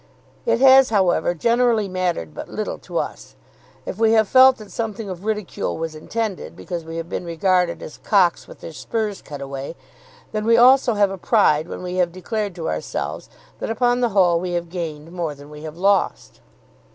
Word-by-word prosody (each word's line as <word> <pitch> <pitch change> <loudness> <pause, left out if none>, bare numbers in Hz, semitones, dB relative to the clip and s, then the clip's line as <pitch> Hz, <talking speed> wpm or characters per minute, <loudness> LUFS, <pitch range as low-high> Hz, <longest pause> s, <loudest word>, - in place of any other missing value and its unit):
It 230 0 +2
has, 270 -1 +7
however, 180 -5 +2
generally 230 +2 +2
mattered 180 - -2
but - - -8
little - - -4
to - - -6
us. - - -5 0.5
If 190 - -6
we 225 0 +4
have 220 -2 +4
felt 260 +3 +6
that 215 -2 -12
something 220 -2 -4
of 185 +1 -7
ridicule 210 -3 -3
was 160 -1 -4
intended, 185 - -4
because 165 - -6
we 165 +1 -7
have 165 0 -4
been 175 - -4
regarded 175 +1 0
as 155 - -10
cocks 190 -5 +2
with - - -14
their 165 - -8
spurs 215 +3 -3
cut 145 -2 -9
away, 135 +3 -6 0.6
then 215 0 -2
we 230 0 +5
also 250 -1 +5
have 205 -1 +3
a 195 - -6
pride 165 -8 +3
when - - -7
we 180 0 -4
have 175 -2 +2
declared 200 +2 -4
to 165 - -5
ourselves 80 0 -4 0.3
that - - -4
upon 245 +2 +1
the 240 -1 +2
whole 180 -5 +3
we 180 0 -4
have 170 -1 -2
gained 165 -3 -5
more 170 -4 -3
than 145 +1 -14
we 150 0 -10
have 155 +1 -8
lost. 195 - 0
185 Hz, 195 wpm, -21 LUFS, 165-220 Hz, 0.6 s, has